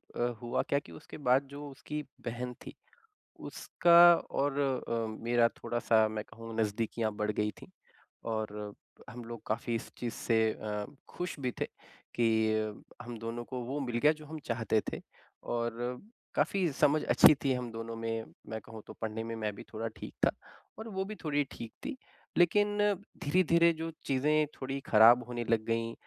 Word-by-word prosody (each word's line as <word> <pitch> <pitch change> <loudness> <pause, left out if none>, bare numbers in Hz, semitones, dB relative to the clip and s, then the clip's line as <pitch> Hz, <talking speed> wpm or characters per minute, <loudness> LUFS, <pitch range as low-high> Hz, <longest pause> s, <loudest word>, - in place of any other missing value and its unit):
अ, - - -5 0.2
हुआ 120 0 0
क्या 140 - +3
कि 85 - -15
उसके 80 - -10
बाद 130 +3 +5
जो 145 +1 -7
उसकी 150 +2 -5 0.2
बहन 125 +1 -3
थी - - -8 0.7
उसका 175 0 +6
और 140 -3 -1 0.3
अ, 115 -1 0 0.2
मेरा 120 0 +4
थोड़ा-सा 115 -2 +2
मैं 110 -1 -4
कहूँ 115 0 -10
नज़दीकियाँ 110 +1 0
बढ़ 105 0 0
गई 105 0 0
थीं - - -12 0.6
और 105 -1 -3 0.4
हम 120 0 -8
लोग 115 -1 -7
काफ़ी 115 +2 -1
इस 115 - -5
चीज़ 120 -1 -3
से 110 -1 +2
अ, 105 -1 -4 0.3
ख़ुश 175 -4 -4
भी 125 -2 -1
थे - - +3 0.5
कि 110 -2 +2 0.3
हम 120 -1 -7
दोनों 115 +1 -4
को 130 +1 -5
वो 135 +5 -3
मिल 120 -4 -2
गया 150 +5 +5
जो 155 - -11
हम 155 +1 -7
चाहते 115 -2 +1
थे - - -5 0.4
और 120 +1 -2 0.4
काफ़ी 190 -3 +2
समझ 150 +2 +3
अच्छी - - +8
थी 135 - +2
हम 125 -2 -3
दोनों 115 0 -5
में। 115 0 -3 0.2
मैं 110 0 -3
कहूँ 110 +1 -10
तो - - -8
पढ़ने 110 0 -3
में 115 0 -4
मैं 110 -2 -2
भी - - -9
थोड़ा 110 +1 -2
ठीक - - -8
था - - +4 0.5
और 220 +1 -7
वो 190 -2 -2
भी 215 +2 -6
थोड़ी 145 -2 +1
ठीक 115 - -7
थी। 290 -1 -3 0.4
लेकिन 205 +4 +4 0.5
धीरे-धीरे 170 +1 +4
जो 160 +1 -4 0.2
चीज़ें 150 +3 +3 0.2
थोड़ी 135 +1 -2
ख़राब 115 +3 +7
होने 120 -1 -3
लग 115 -1 +3
गईं। 115 0 -1
120 Hz, 175 wpm, -31 LUFS, 110-145 Hz, 0.7 s, अच्छी